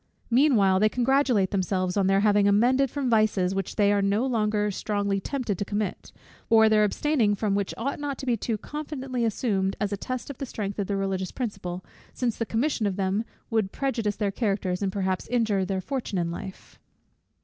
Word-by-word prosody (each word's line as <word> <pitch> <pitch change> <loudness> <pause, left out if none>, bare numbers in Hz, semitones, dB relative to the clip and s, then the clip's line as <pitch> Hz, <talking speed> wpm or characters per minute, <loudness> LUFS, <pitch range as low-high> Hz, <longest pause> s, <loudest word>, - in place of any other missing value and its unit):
Meanwhile 230 -8 +4
they 215 +2 +4
congratulate 250 -5 +2
themselves 185 -1 0
on 195 -2 +2
their 195 0 +3
having 205 -1 +4
amended 250 +7 +3
from 280 0 -2
vices, 215 -5 +2
which 195 -1 -3
they 205 -1 +3
are 200 - +2
no 200 +5 +1
longer 210 -4 +1
strongly 200 0 -1
tempted 230 -3 -3
to - - 0
commit, 205 0 -3 0.4
or 220 -1 +6
their 215 -1 +4
abstaining 220 0 +1
from 205 0 -1
which 200 -1 0
ought 275 +6 -3
not 285 -2 -3
to 270 - -7
be 245 -2 +2
too 225 0 -2
confidently 270 -2 -4
assumed 195 -4 0
as 205 -1 -1
a - - -2
test 255 +6 -5
of 270 - -12
the 275 - -3
strength 205 -3 -4
of 200 - -1
the 200 - -1
religious 190 -1 -2
principle, 185 -7 -5 0.3
since 240 -3 -1
the 230 - -3
commission 230 -2 0
of 195 - -2
them 195 +2 0 0.3
would 215 -4 +1
prejudice 230 -7 -1
their 205 -2 -1
characters, 195 -4 -1
and 195 -1 0
perhaps 190 -1 -2
injure 220 -6 +1
their 190 0 -2
fortune 255 -3 -3
in 170 -1 -1
life. 190 +2 -9
210 Hz, 195 wpm, -26 LUFS, 195-240 Hz, 0.4 s, or